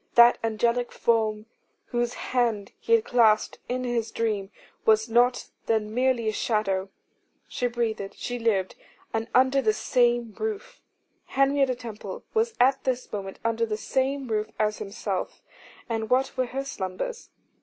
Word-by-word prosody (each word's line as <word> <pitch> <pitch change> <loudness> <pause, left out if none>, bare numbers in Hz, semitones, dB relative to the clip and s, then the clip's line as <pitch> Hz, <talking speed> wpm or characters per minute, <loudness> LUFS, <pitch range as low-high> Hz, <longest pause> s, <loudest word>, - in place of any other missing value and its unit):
That 235 0 +7
angelic 235 +2 +1
form 220 -2 +1 0.4
whose 240 0 -1
hand 230 -5 -1
he 460 - 0
had 455 -1 +4
clasped 220 -3 +3
in 255 +1 -1
his 235 -2 -1
dream, 210 -4 -1 0.3
was 220 0 +4
not 240 +2 +2 0.2
then 215 -1 0
merely 250 -2 +1
a - - +3
shadow. 195 -4 0 0.6
She 245 - -1
breathed, 225 -4 -2
she 245 0 -4
lived, 205 -5 +1 0.4
and 225 +1 -1
under 260 +2 +5
the 215 -4 +2
same 240 0 +1
roof. 440 +2 -4 0.4
Henrietta 275 -1 +2
Temple 215 -5 -8
was 450 +1 +1
at 265 +2 +4
this 255 -1 -2
moment 195 -2 -5
under 230 0 +1
the 215 -1 -2
same 265 +4 -1
roof 215 -1 -1
as 210 -1 0
himself: 200 -2 -4 0.4
and 225 -2 -2
what 260 +2 +2
were 255 -2 0
her 270 +3 -4
slumbers? 235 - -5
235 Hz, 145 wpm, -26 LUFS, 215-255 Hz, 0.6 s, That